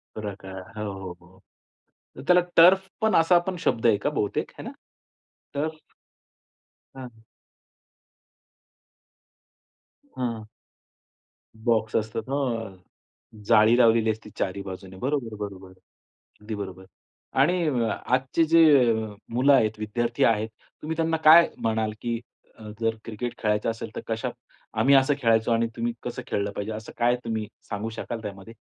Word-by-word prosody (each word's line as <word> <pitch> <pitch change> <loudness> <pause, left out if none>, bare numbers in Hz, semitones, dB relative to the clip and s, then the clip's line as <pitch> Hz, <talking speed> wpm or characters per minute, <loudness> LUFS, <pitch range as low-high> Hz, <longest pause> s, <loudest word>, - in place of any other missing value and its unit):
प्रकार. 95 -3 -7
हो, 105 -2 -3
हो, 95 -2 -7
हो. 90 +2 -21 0.8
तर - - -7
त्याला 180 0 +6 0.2
टर्फ 190 +3 +7
पण 220 0 +2
असा 165 +2 +5
पण 185 - -2
शब्द 115 - +1
आहे 110 -3 +5
का - - +3
बहुतेक? 105 -9 -2
आहे - - -7
ना? - - -6 0.8
टर्फ. 155 +2 -2 1.2
हां. 120 -4 -10 3.0
हं. 115 -3 -2 1.2
बॉक्स 110 -2 +1
असतात, 110 0 -2
हां. 115 -8 -2 0.7
जाळी 110 +1 +5
लावलेली 115 -2 +4
असते 110 0 -8
चारी 100 +1 -2
बाजूने. 95 -1 -8
बरोबर, 125 -1 -2
बरोबर. 95 -2 -11 0.7
अगदी 110 +1 -5
बरोबर. 95 -2 -7 0.6
आणि 170 +3 +2 0.5
आजची 130 +5 +2
जे 155 -7 +6 0.4
मुलं 130 +4 +4
आहेत, 110 -5 +2
विद्यार्थी 115 +3 -1
आहेत, 110 -1 +2 0.3
तुम्ही 160 +2 -3
त्यांना 165 0 +1
काय 165 +2 +8
म्हणाल, 110 -1 0
की 115 -1 -2 0.4
अ, 110 - -13 0.2
जर 115 -1 0
क्रिकेट 115 +2 -4
खेळायचं 105 0 0
असेल, 115 0 -5
तर - - -4
कशा - - -2 0.5
आम्ही 135 +5 +5
असं 135 +1 +4
खेळायचो 115 -1 +3
आणि 115 0 +2
तुम्ही 120 0 -1
कसं 125 +1 -5
खेळलं 100 0 -1
पाहिजे, 105 +2 -5
असं 110 0 -8
काय 120 +1 +3
तुम्ही 110 -2 -3 0.2
सांगू 105 +1 -3
शकाल 115 +1 -6
त्यामध्ये? 100 +1 -8
115 Hz, 135 wpm, -25 LUFS, 105-130 Hz, 3.0 s, काय